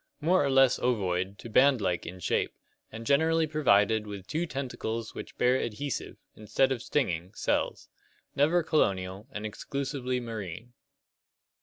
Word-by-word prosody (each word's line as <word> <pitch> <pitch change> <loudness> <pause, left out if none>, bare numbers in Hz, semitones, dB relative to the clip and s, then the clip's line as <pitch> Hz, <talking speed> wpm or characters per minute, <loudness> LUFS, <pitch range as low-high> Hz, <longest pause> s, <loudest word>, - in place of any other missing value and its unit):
More 170 +2 +3
or 140 - +1
less 135 -2 +5
ovoid 95 -5 0
to - - -9
band 130 +3 +5
like 90 -4 -1
in 90 +2 -7
shape, - - 0 0.4
and 115 +1 -8
generally 160 +5 +3
provided 110 -8 +3
with 100 -2 -7
two 160 - -2
tentacles 115 -5 -4
which - - -9
bear 125 +1 +3
adhesive, 135 +5 -4 0.2
instead 130 +5 +1
of 125 -3 -1
stinging, 90 - -1
cells. - - -1 0.5
Never 160 +5 +3
colonial, 95 -9 0
and 105 -3 -5
exclusively 130 +3 -3
marine. 115 -1 -7
120 Hz, 140 wpm, -29 LUFS, 100-140 Hz, 0.5 s, less